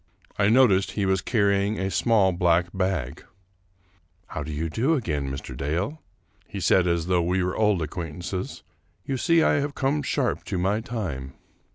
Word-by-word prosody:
I 100 0 +4
noticed 110 -6 +4
he 100 - -1
was 95 0 +1
carrying 100 -2 +1
a 95 0 -2
small 105 -5 +3
black 85 -1 +2
bag. 95 -9 -2 0.5
" 90 -2 -38
How 80 - -5
do 80 +1 -5
you 75 +2 -2
do 125 - +1
again, 75 - -2
Mr. 65 -1 -6
Dale? 85 - -2 0.2
" - - -38
he 100 - -5
said 90 0 +3
as 85 -2 0
though 90 -1 +2
we 90 +2 0
were 90 0 -2
old 105 -6 +2
acquaintances; 90 +3 -5 0.2
" 85 +1 -41
you 135 - -2
see 165 +5 +3
I 145 - +3
have 145 0 -3
come 140 +2 0
sharp 140 -3 -1
to 95 - -3
my 95 +4 +1
time." 85 - -5
95 Hz, 185 wpm, -25 LUFS, 85-110 Hz, 0.5 s, I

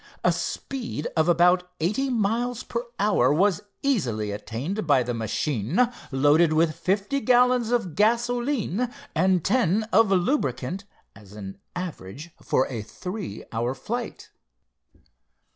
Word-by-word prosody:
A - - +4
speed 240 - -4
of 160 +1 +3
about 180 +1 +4
eighty 215 +12 0
miles 235 +1 0
per 235 +1 -4
hour 195 -11 +3
was 185 +4 +2 0.2
easily 120 - 0
attained 140 - -4
by 135 -4 +4
the 120 0 -3
machine 125 - 0 0.2
loaded 145 +4 +4
with 160 0 +3
fifty 200 +8 0
gallons 250 -2 +4
of 225 -9 0
gasoline 240 - +1 0.2
and 185 -3 +2
ten 220 -4 +2
of 220 +1 +5
lubricant, 185 - 0 0.3
as 100 -1 -15
an 100 -2 -8 0.2
average 160 - -6
for 130 - +1
a 120 -5 -5
three 180 - -6
hour 120 +3 -1
flight. 230 - -5
180 Hz, 125 wpm, -25 LUFS, -, 0.3 s, of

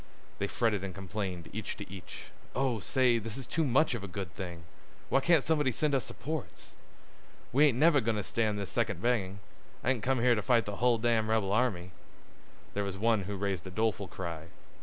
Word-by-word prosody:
They 100 - 0
fretted 105 -3 0
and 95 -2 -5
complained 95 -2 -4
each - - -4
to - - -7
each. 95 -3 -10 0.2
"Oh, 130 -4 +1
say, 120 +4 +2
this 115 +1 -5
is 135 - -5
too 160 - 0
much 135 +1 +3
of 115 -4 -4
a - - -4
good 95 -1 -6
thing! 85 -4 -6 0.5
Why - - +4
can't 160 0 +4
somebody 150 -4 +2
send 150 +5 0
us 130 -4 +1
supports?" 155 +2 -6 0.8
"We 145 +4 +6
ain't 125 -5 +1
never 150 0 +5
goin' 115 0 0
to 105 - -1
stand 110 0 0
this 100 -3 -4
second 105 -6 0
banging. 100 -4 0 0.4
I - - +1
didn't 125 -4 -1
come 130 0 +2
here 125 0 +5
to 105 - 0
fight 120 0 +3
the 105 -1 -4
hull 120 +1 +3
damn' 110 -1 +1
rebel 110 -3 +2
army." 100 -6 +1 0.8
There 100 - -1
was 100 -1 -4
one 110 -1 +2
who 100 +1 -4
raised 95 -2 -2
a - - -5
doleful 105 0 0
cry. 85 -3 -5
110 Hz, 205 wpm, -31 LUFS, 95-125 Hz, 0.8 s, We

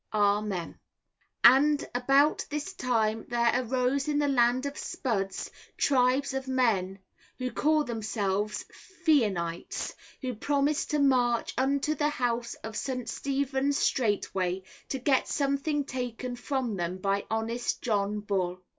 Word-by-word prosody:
Amen. 205 -3 0 0.6
And 285 +4 +6
about 275 +4 +3
this 295 0 -4
time 225 -3 0
there 235 -1 +2
arose 255 +3 0
in 295 -1 +1
the 290 0 +2
Land 250 -1 +3
of 280 0 -3
Spuds 195 -11 -3 0.3
tribes 265 +1 +2
of 265 0 -3
men 220 -8 +1 0.4
who 255 -1 -3
call 305 +5 +2
themselves 210 -3 -2 0.4
Feenanites, 195 - +1 0.3
who 255 -1 -2
promised 285 +5 0
to 300 - +1
march 250 -4 +2
unto 275 +3 +1
the 295 -1 +1
house 240 -3 -1
of 220 0 -6
St. 255 -1 -3
Stephen's 275 0 0
straightway, 190 -5 0 0.3
to 270 - -1
get 265 +1 +2
something 280 +1 0
taken 250 -1 -4
from 245 -4 -2
them 175 +1 -2
by 195 +1 -1
honest 225 +2 -2
John 210 -2 0
Bull. 185 -3 -1
245 Hz, 130 wpm, -28 LUFS, 210-275 Hz, 0.6 s, And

